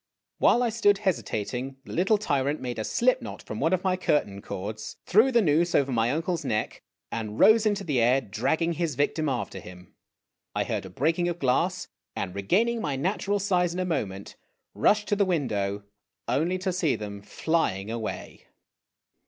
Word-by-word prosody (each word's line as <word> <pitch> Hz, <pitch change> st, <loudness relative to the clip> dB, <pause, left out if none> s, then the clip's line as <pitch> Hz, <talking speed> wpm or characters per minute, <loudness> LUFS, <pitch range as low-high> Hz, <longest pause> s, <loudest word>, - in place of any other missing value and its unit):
While 245 Hz, -, +4 dB
I 240 Hz, -, +2 dB
stood 205 Hz, -3 st, +2 dB
hesi 190 Hz, -3 st, +2 dB
tating, 125 Hz, +5 st, -4 dB
the -, -, -8 dB
little 195 Hz, +5 st, +3 dB
tyrant 145 Hz, -7 st, 0 dB
made 125 Hz, -3 st, -4 dB
a -, -, -1 dB
slip 255 Hz, -, +2 dB
knot -, -, -8 dB
from 105 Hz, -, -6 dB
one 160 Hz, +4 st, +1 dB
of 185 Hz, -1 st, +1 dB
my 185 Hz, -1 st, +2 dB
curtain 105 Hz, -, 0 dB
cords, 110 Hz, +4 st, -6 dB
threw 220 Hz, +7 st, +5 dB
the 235 Hz, -3 st, +4 dB
noose 170 Hz, +2 st, +2 dB
over 140 Hz, -1 st, +2 dB
my 115 Hz, -1 st, +2 dB
uncle's 165 Hz, +4 st, -1 dB
neck, 110 Hz, -1 st, -2 dB, 0.3 s
and 110 Hz, -2 st, -4 dB
rose 220 Hz, 0 st, +6 dB
into 205 Hz, -1 st, 0 dB
the 145 Hz, -8 st, +1 dB
air, 125 Hz, +3 st, +4 dB
dragging 135 Hz, -, -1 dB
his 165 Hz, -4 st, -2 dB
victim 145 Hz, +2 st, 0 dB
after 120 Hz, -7 st, -3 dB
him. 90 Hz, 0 st, -13 dB, 0.6 s
I -, -, +1 dB
heard 105 Hz, -4 st, -3 dB
a -, -, -11 dB
breaking 165 Hz, -, 0 dB
of 175 Hz, -, -3 dB
glass, 175 Hz, +6 st, 0 dB, 0.3 s
and, 90 Hz, -, -3 dB
regaining 220 Hz, -, +1 dB
my 145 Hz, -7 st, -1 dB
natural 195 Hz, +7 st, 0 dB
size 180 Hz, -3 st, +1 dB
in -, -, -3 dB
a 185 Hz, -, 0 dB
moment, 100 Hz, -, -3 dB, 0.4 s
rushed 210 Hz, 0 st, +2 dB
to 205 Hz, -, +3 dB
the 200 Hz, -, +3 dB
window 105 Hz, -, -1 dB, 0.4 s
only 160 Hz, +10 st, +1 dB
to 185 Hz, 0 st, -2 dB
see 175 Hz, -5 st, +1 dB
them 100 Hz, -1 st, -7 dB
flying 105 Hz, -, -1 dB
away 115 Hz, -2 st, -6 dB
155 Hz, 185 wpm, -27 LUFS, 110-185 Hz, 0.6 s, rose